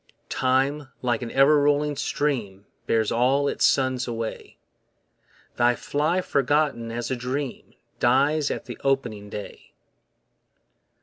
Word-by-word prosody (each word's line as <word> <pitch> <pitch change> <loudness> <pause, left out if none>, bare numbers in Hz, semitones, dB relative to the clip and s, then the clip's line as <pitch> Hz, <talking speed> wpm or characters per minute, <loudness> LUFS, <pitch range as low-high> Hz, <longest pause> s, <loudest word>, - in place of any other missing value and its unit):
Time 135 +3 +1 0.2
like 120 -2 0
an 120 - -4
ever 140 +4 +5
rolling 145 0 +2
stream 115 -10 -2 0.2
Bears 110 -2 +1
all 135 +4 +2
its - - -1
sons 130 -2 +2
away; 115 -2 -5 1.0
They 120 0 +3
fly 155 +9 0
forgotten 140 -6 0
as 120 +2 -4
a - - +1
dream 130 +2 -5 0.2
Dies 140 +4 +3
at - - -4
the - - -8
opening 120 -7 -1
day. 105 0 -9
130 Hz, 120 wpm, -24 LUFS, 120-145 Hz, 1.0 s, ever